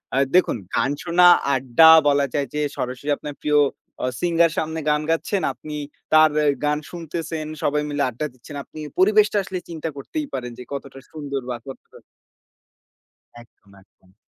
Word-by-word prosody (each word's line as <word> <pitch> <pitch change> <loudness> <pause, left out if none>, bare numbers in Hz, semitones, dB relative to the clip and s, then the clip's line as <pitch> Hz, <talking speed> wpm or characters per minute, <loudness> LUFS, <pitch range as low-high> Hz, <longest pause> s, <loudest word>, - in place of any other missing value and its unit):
আ - - +1 0.2
দেখুন 180 -9 +3 0.2
গান 135 - +1
শোনা, 180 +1 +3 0.3
আড্ডা 130 +5 +5 0.2
বলা 140 -1 +3
যায় 140 -2 -1
যে 150 - -1 0.2
সরাসরি 130 +3 -4
আপনার 145 -1 -8
প্রিয় 150 0 +3 0.4
আ - - +1 0.2
সিঙ্গার 170 -1 +3
সামনে 160 0 -2
গান 150 0 +2
গাচ্ছেন। 170 +4 0
আপনি 150 -1 -9 0.4
তার 155 0 +7 0.3
গান 150 0 +1
শুনতেছেন, 165 -2 -5 0.2
সবাই 150 +1 +1
মিলে 145 -1 -1
আড্ডা 125 +5 -4
দিচ্ছেন। 130 +4 -12
আপনি 155 - -13 0.2
পরিবেশটা 210 +2 +4
আসলে 185 -1 -5
চিন্তা 165 -1 -4
করতেই 295 - -5
পারেন 125 -2 -4
যে 125 - -8
কতটা 135 -1 -7
সুন্দর 140 -3 -5
বা 125 - -2
কতটা 135 - -11 1.4
একদম, 105 -3 -23
একদম। 95 -1 -29
150 Hz, 155 wpm, -22 LUFS, 135-165 Hz, 1.4 s, তার